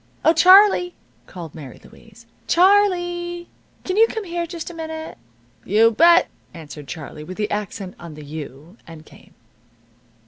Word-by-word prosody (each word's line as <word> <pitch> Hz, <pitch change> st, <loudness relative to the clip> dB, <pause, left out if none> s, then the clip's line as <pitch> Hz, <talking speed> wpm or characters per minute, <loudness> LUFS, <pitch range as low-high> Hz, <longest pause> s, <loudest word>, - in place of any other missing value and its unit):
"Oh, 320 Hz, -, +5 dB
Charlie!" 365 Hz, +1 st, +5 dB, 0.3 s
called 170 Hz, -4 st, -10 dB
Mary 145 Hz, -5 st, -11 dB
Louise. -, -, -18 dB, 0.2 s
"Charlee! 350 Hz, -2 st, +1 dB, 0.3 s
Can 370 Hz, +1 st, -3 dB
you 450 Hz, +1 st, +6 dB
come 445 Hz, -1 st, -5 dB
here 345 Hz, -2 st, -4 dB
just 340 Hz, 0 st, -7 dB
a -, -, -12 dB
minute?" 320 Hz, -, -8 dB, 0.4 s
"You 225 Hz, +3 st, +3 dB
bet!" 340 Hz, +8 st, +5 dB, 0.3 s
answered 150 Hz, -3 st, -11 dB
Charlie, 150 Hz, -1 st, -9 dB
with 185 Hz, +4 st, -10 dB
the 210 Hz, -1 st, -3 dB
accent 200 Hz, -2 st, -5 dB
on 170 Hz, -3 st, -10 dB
the 150 Hz, -1 st, -11 dB
you; 155 Hz, -, -10 dB
and 160 Hz, -2 st, -13 dB
came. -, -, -20 dB
315 Hz, 145 wpm, -20 LUFS, -, 0.4 s, you